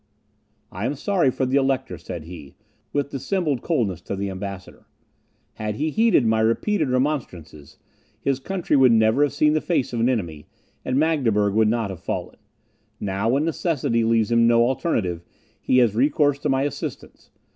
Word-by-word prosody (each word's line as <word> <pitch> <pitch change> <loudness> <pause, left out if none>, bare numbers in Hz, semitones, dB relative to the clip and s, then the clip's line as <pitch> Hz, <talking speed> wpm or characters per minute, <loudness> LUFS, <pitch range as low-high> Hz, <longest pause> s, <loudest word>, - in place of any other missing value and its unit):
"I 100 +6 -3
am 145 - -2
sorry 175 -1 +1
for 130 +1 -1
the 130 +2 +1
Elector," 135 -1 -1
said - - -7
he, 80 -4 -11 0.4
with 145 -1 -2
dissembled 145 -1 -1
coldness, 110 - -1
to 100 - -5
the 100 0 -3
ambassador; 95 -1 -8 0.7
"had 105 -1 -4
he 155 +6 -1
heeded 220 - +3
my 110 0 +2
repeated 130 - +1
remonstrances, 120 - -3 0.4
his 135 -1 -1
country 180 +1 -1
would 130 -3 +6
never 110 +3 +3
have 145 - +3
seen 150 +1 +2
the 155 - +1
face 160 -8 -1
of 120 - -2
an 115 +2 +2
enemy, 85 -12 -3 0.4
and 130 - -1
Magdeburg 120 -10 +2
would 110 +1 +3
not 115 -3 -1
have 95 - -8
fallen. - - -5 0.6
Now, 100 +2 -1
when 140 +5 +1
necessity 150 -8 0
leaves 115 0 +1
him 115 0 +4
no 115 0 +4
alternative, 105 - -1 0.4
he 130 - +2
has 120 -5 +4
recourse 145 +3 +2
to - - -2
my 135 0 +1
assistance. 145 - -6
125 Hz, 170 wpm, -23 LUFS, 105-145 Hz, 0.7 s, would